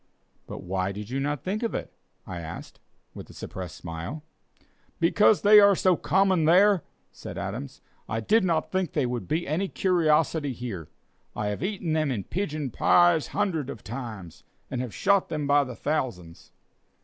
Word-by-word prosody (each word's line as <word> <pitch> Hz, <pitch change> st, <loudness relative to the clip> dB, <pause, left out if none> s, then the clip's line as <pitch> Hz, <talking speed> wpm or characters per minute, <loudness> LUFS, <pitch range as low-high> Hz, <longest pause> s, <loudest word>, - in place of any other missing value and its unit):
"But -, -, -8 dB
why 95 Hz, +1 st, -2 dB
did 105 Hz, +3 st, -8 dB
you 135 Hz, -, -1 dB
not 145 Hz, 0 st, -2 dB
think 205 Hz, +4 st, -2 dB
of 230 Hz, -, -2 dB
it?" -, -, -5 dB, 0.3 s
I 90 Hz, -2 st, -6 dB
asked, 80 Hz, 0 st, -9 dB, 0.3 s
with -, -, -10 dB
a -, -, -12 dB
suppressed 90 Hz, -3 st, -7 dB
smile. 85 Hz, -, -7 dB, 0.8 s
"Because 205 Hz, +5 st, +4 dB
they 210 Hz, +1 st, +9 dB
are 200 Hz, -1 st, +6 dB
so 185 Hz, 0 st, +3 dB
common 190 Hz, -2 st, +2 dB
there," 190 Hz, +3 st, +5 dB, 0.3 s
said -, -, -9 dB
Adams, 70 Hz, -, -6 dB, 0.3 s
"I 110 Hz, -, -1 dB
did 215 Hz, -, +3 dB
not 165 Hz, -3 st, 0 dB
think 185 Hz, -4 st, -1 dB
they 145 Hz, -4 st, +1 dB
would 120 Hz, -1 st, -3 dB
be 160 Hz, +3 st, -1 dB
any 165 Hz, +7 st, 0 dB
curiosity 160 Hz, -6 st, +1 dB
here. 110 Hz, -10 st, -6 dB, 0.5 s
I 105 Hz, -1 st, -2 dB
have 105 Hz, -, -4 dB
eaten 185 Hz, -4 st, -2 dB
them 155 Hz, -2 st, +1 dB
in 115 Hz, -7 st, -2 dB
pigeon 155 Hz, -, -3 dB
pies 175 Hz, +4 st, +4 dB
hundreds 170 Hz, -9 st, -1 dB
of 110 Hz, -, -8 dB
times, 110 Hz, -8 st, -8 dB, 0.3 s
and 125 Hz, -2 st, -2 dB
have 125 Hz, -3 st, -5 dB
shot 200 Hz, -, +2 dB
them 150 Hz, -2 st, -2 dB
by 145 Hz, 0 st, +4 dB
the 130 Hz, -3 st, -7 dB
thousands!" 115 Hz, -, -4 dB
150 Hz, 175 wpm, -26 LUFS, 115-185 Hz, 0.8 s, they